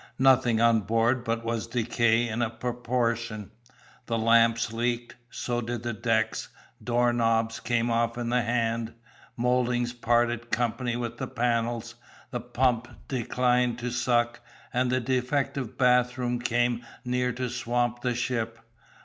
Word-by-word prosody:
Nothing 130 -3 +4
on 115 -1 +5
board 115 +4 +1
but 115 0 -2
was 115 -1 -2
decayed 115 0 +1
in 115 +2 -2
a 115 - +1
proportion; 115 -3 -2 0.6
the 115 - 0
lamps 115 0 +3
leaked; 120 +1 -2
so 120 -1 -2
did 120 0 -4
the 120 0 -2
decks; 110 0 0 0.3
door 120 +1 +2
knobs 115 -1 +1
came 120 0 0
off 115 0 +1
in 120 -1 -2
the 125 +1 +2
hand, 115 -1 -1 0.4
mouldings 120 0 +1
parted 120 0 +1
company 120 0 -1
with 120 -1 -4
the - - -3
panels, 120 -1 -1 0.4
the 120 - -2
pump 120 0 +1 0.2
declined 125 -1 +1
to 120 +1 -3
suck, 120 -1 +1 0.3
and 125 0 +1
the 130 - +2
defective 130 +1 -1
bathroom 125 -1 +2
came 120 0 0 0.2
near 125 0 0
to 125 +1 -3
swamp 120 0 -1
the 125 -1 0
ship. 115 -2 -2
120 Hz, 140 wpm, -27 LUFS, 115-125 Hz, 0.6 s, on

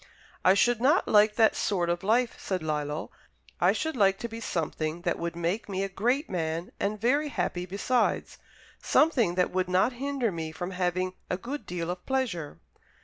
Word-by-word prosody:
"I 185 +1 +6
should 240 +2 +3
not 295 +8 +3
like 210 0 +5
that 220 0 +4
sort 180 -4 0
of 175 0 0
life," 235 +4 +2
said 185 -4 -3
Lillo, 150 0 -3 0.5
"I - - +5
should 320 -2 -2
like 195 -4 +3
to 235 - -2
be 225 0 -7
something 160 -4 -3
that - - -1
would 170 0 -3
make 175 +6 -2
me 195 0 -1
a 195 - -2
great 245 - 0
man, 165 -1 -3
and 210 +1 -1
very 280 +7 +2
happy 180 -7 -2
besides 205 +7 0 0.4
something 245 - +3
that 180 0 +1
would 185 0 0
not 185 +7 +3
hinder 265 -2 -1
me 160 -2 -4
from 175 +3 -5
having 185 0 -1 0.2
a 180 - 0
good 270 +9 -6
deal 175 -1 -3
of 180 0 -7
pleasure." 230 - -2
190 Hz, 185 wpm, -28 LUFS, 175-235 Hz, 0.5 s, I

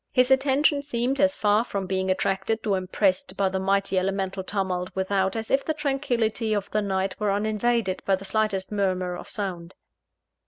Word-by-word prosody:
His 255 +1 +3
attention 280 +2 +3
seemed 265 -1 -1
as 285 0 +3
far 210 +1 +3
from 200 -5 -4
being 190 0 -1
attracted 195 +4 0
or 205 -2 +2
impressed 185 0 0
by 195 -1 +2
the 190 0 -2
mighty 195 0 +1
elemental 190 0 -2
tumult 185 -2 -2
without, 190 +1 0
as 225 0 -4
if 270 +1 +3
the 315 - -2
tranquillity 245 -7 0
of 200 -1 -3
the 215 - +1
night 190 -1 -1
were 210 -1 +1
uninvaded 215 0 0
by 195 - +2
the 190 +1 -9
slightest 200 -1 -1
murmur 185 -3 0
of - - -9
sound. 180 -4 -4
200 Hz, 180 wpm, -25 LUFS, 190-230 Hz, -, His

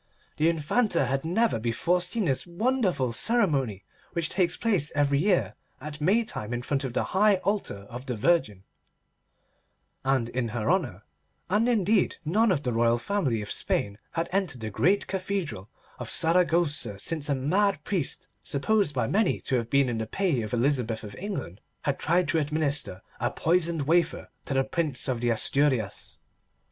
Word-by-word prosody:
The 160 +2 +3
Infanta 170 - +1
had 135 +2 -1
never 185 - +1
before 120 +11 0
seen 190 +4 -1
this 135 +2 0
wonderful 185 - 0
ceremony 135 - +2 0.3
which 170 -1 -1
takes 180 -3 +1
place 195 -10 +1
every 145 -1 +2
year 185 +2 +2 0.3
at 150 0 -8
Maytime 185 - 0
in 120 - -4
front 140 +1 -1
of 130 -3 -4
the - - +1
high 205 +2 +5
altar 195 - -2
of 125 +4 -9
the 125 - -2
Virgin, 110 - +1 1.4
and 130 -3 +1
in 120 -1 -2
her 115 +5 -1
honour; 125 - -1 0.5
and 220 +5 +3
indeed 210 -3 +2
none 215 +7 +3
of 150 -5 0
the 125 - -1
royal 115 +1 +3
family 130 - -1
of 100 - -6
Spain 100 +1 -1
had 165 0 -1
entered 180 - -1
the 110 -1 -4
great 185 - +2
cathedral 185 - -3 0.3
of - - -6
Saragossa 165 - +2
since 150 +7 -2
a 140 - +2
mad 180 +6 +1
priest, 175 -4 -2
supposed 155 +2 +1
by 125 -3 +1
many 205 - +1
to 130 - -1
have 115 -1 -3
been 140 0 +3
in 120 -2 -2
the 110 - -3
pay 175 - 0
of 110 -1 -5
Elizabeth 120 -3 0
of 105 -1 -8
England, 140 - -5 0.2
had 140 -1 -1
tried 175 +3 +2
to 165 - +3
administer 145 -9 -1 0.2
a - - 0
poisoned 165 -2 +1
wafer 165 +3 +1 0.2
to 135 - -3
the 135 - +3
Prince 140 -1 -2
of 125 -3 -1
the 120 - +1
Asturias. 120 -2 +1
150 Hz, 170 wpm, -27 LUFS, 120-180 Hz, 1.4 s, high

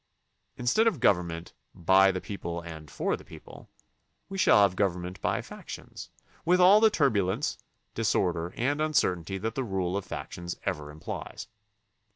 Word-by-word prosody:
Instead 125 - +2
of 225 - +1
government 90 -7 +1 0.2
"by 95 +3 +5
the 95 - -3
people 90 -4 -5
and 80 -3 -9
for - - -1
the - - -13
people" - - -13 0.6
we 195 - -5
shall 105 - +6
have 95 -2 +2
government 90 -1 -2
by - - 0
factions, - - -9 0.3
with 180 +2 +3
all 190 +4 +8
the 220 0 +6
turbu 135 - +2
lence, 95 - -1 0.4
disorder, 90 -6 0
and 145 +5 0
uncertainty 95 - +1
that 110 +3 -3
the 135 - -2
rule 95 -4 -2
of 100 - -2
fac - - -7
tions 85 0 -5
ever 75 -1 -3
implies. 75 +1 -7
95 Hz, 160 wpm, -28 LUFS, 85-125 Hz, 0.6 s, all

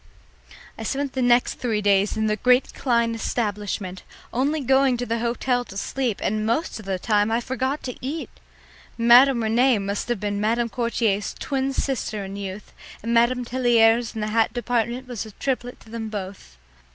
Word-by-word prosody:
I - - -5
spent 280 -1 -2
three 245 -2 +2
days 200 0 +2
at 220 0 +1
the 215 - +1
great 250 +4 +3
Klein 235 -3 +1
establishment, 205 -4 -3 0.3
only 280 +6 +1
going 265 -1 +3
to 245 - -3
the 230 0 -1
hotel 245 +1 0
to 195 - -10
sleep, 245 0 -2
and 215 +1 0
most 230 +4 -1
of 210 - -11
the 190 -1 -1
time 210 +2 +1
I 230 - +2
forgot 260 +3 -2
to 250 - -5
eat. 300 +5 -4 0.7
Madame 240 +1 +6
Rene 240 +3 +3
must 200 +1 -3
have 240 -4 0
been 205 0 -2
Madame 230 +2 +1
Courtier's 225 -4 -1
twin 270 -1 -1
sister 225 -7 -2
in 195 +1 -7
youth, 200 0 -7 0.3
and 230 +1 -1
Madame 240 +1 +3
Telliers 235 -2 +3
in 220 - -3
the 210 - -2
hat 220 0 +2
department 240 +1 -1
was 245 -4 -5
the 220 -2 -7
triplet 245 -1 -3
to - - -17
them 225 -1 -4
both. 190 - -7
235 Hz, 175 wpm, -23 LUFS, 215-250 Hz, 0.7 s, Madame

